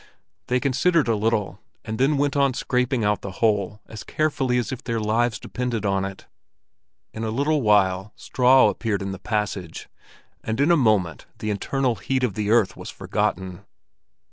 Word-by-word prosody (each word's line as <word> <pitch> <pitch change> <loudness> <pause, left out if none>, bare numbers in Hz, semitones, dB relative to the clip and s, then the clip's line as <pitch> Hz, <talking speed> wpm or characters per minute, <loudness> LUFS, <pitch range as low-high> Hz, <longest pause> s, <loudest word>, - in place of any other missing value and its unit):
They 125 0 +1
considered 145 +4 +2
a 115 - +2
little, 110 -1 -1 0.3
and 110 0 -5
then 140 +3 +3
went 145 0 0
on 140 -3 +2
scraping 125 -1 0
out 105 0 +1
the 100 - -7
hole 105 0 0
as 110 - -9
carefully 145 -5 0
as 120 +3 -1
if 130 - -6
their 115 -2 -2
lives 110 +1 +1
depended 120 -2 -4
on 95 -1 +1
it. 95 0 -8 0.9
In 110 - -5
a 110 - -1
little 145 +6 +1
while 100 -2 +2
straw 130 +1 +4
appeared 105 -4 -2
in 95 - -4
the 95 - -7
passage, 100 -5 -3 0.5
and 110 +2 -3
in 145 +5 +4
a - - +6
moment 105 - +1
the 110 - -3
internal 125 +4 -1
heat 130 -1 -1
of 120 -5 +1
the 105 +1 -2
earth 110 -4 +3
was - - -8
forgotten. 95 0 -3
110 Hz, 175 wpm, -23 LUFS, 105-130 Hz, 0.9 s, a